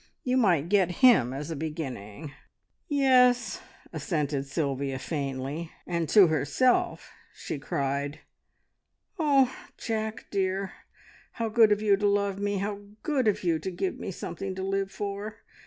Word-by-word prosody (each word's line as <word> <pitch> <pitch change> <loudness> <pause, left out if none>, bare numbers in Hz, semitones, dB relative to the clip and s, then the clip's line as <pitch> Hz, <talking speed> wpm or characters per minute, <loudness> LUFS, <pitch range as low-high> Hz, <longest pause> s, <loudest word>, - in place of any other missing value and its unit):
You 255 0 0
might 180 - +3
get 190 -2 +3 0.2
him 180 - +6
as 145 +5 -5
a - - -3
beginning." 145 - -6 0.6
"Yes," 255 -4 +3 0.3
assented 145 -5 -2
Sylvia 140 -2 -2
faintly; 140 +2 -4 0.2
and 170 -3 -2
to 205 -3 +8
herself 160 - +1 0.2
she 145 - -5
cried, 140 +1 -2 1.0
"Oh, 275 -5 +3 0.2
Jack 220 -1 -3
dear 195 0 -1 0.6
how 230 -2 -2
good 220 -1 +5
of 210 +1 +2
you 200 -2 +4
to 205 +1 +1
love 200 -1 +1
me! 205 0 -1
How 200 +1 -3 0.2
good 275 -6 +1
of 210 - +1
you 165 -3 +1
to 170 - -4
give 185 +1 -3
me - - -5
something 190 +1 -5
to 190 - -4
live 195 0 -1
for! 205 +1 -6
190 Hz, 140 wpm, -28 LUFS, 150-215 Hz, 1.0 s, to